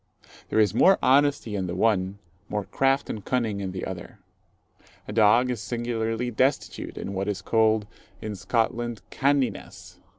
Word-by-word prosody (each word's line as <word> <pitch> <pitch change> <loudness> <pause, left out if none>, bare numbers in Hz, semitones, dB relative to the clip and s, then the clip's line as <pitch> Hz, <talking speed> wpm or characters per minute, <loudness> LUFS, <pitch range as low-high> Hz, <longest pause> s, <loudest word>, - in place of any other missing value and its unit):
There - - -1
is 105 -4 +3
more 190 0 +5
honesty 135 -4 +3
in 95 -2 -2
the 85 - -4
one, 95 -2 +1 0.3
more 105 -1 -2
craft 135 +7 +1
and 105 - -5
cunning 115 -5 -1
in 95 -1 -3
the 90 0 -5
other. 90 -2 -7 0.9
A 105 - -5
dog 115 +3 +4
is 120 -4 -4
singularly 120 0 -2
destitute 130 +5 -1
in 100 - -5
what 95 +1 -2
is 100 -3 -3
called 110 -1 +2 0.3
in 110 -2 -5
Scotland, 115 +2 -1
"canniness." 140 -1 -1
110 Hz, 155 wpm, -25 LUFS, 100-125 Hz, 0.9 s, more